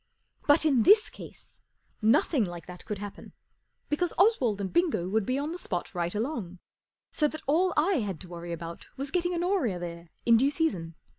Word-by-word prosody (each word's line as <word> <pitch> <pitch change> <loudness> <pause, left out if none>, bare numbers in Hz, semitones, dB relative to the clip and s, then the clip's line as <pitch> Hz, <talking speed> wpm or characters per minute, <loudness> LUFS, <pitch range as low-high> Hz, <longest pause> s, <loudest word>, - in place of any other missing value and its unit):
But, 295 +2 +5
in 275 -6 +4
this 420 - +5
case, - - -13 0.4
nothing 245 +4 +3
like 175 -4 -6
that 180 -1 -11
could 210 - -4
happen, 205 0 -9 0.5
because 335 +4 -1
Oswald 275 - +3
and 195 -2 -4
Bingo 335 - +1
would 210 +1 0
be 255 - +1
on 290 +3 -2
the 350 - -5
spot 175 - -3
right 175 +1 -2
along, 215 - -3 0.5
so 300 - +2
that 310 +1 -7
all 345 +6 +3
I 335 +2 +3
had 195 -7 -3
to 185 - -9
worry 170 0 -7
about 170 0 -7
was 275 +1 -4
getting 355 0 0
Honoria 345 - 0
there 170 -1 -7 0.2
in 230 -1 +6
due 270 +4 +3
season. 190 - -1
235 Hz, 190 wpm, -28 LUFS, -, 0.5 s, in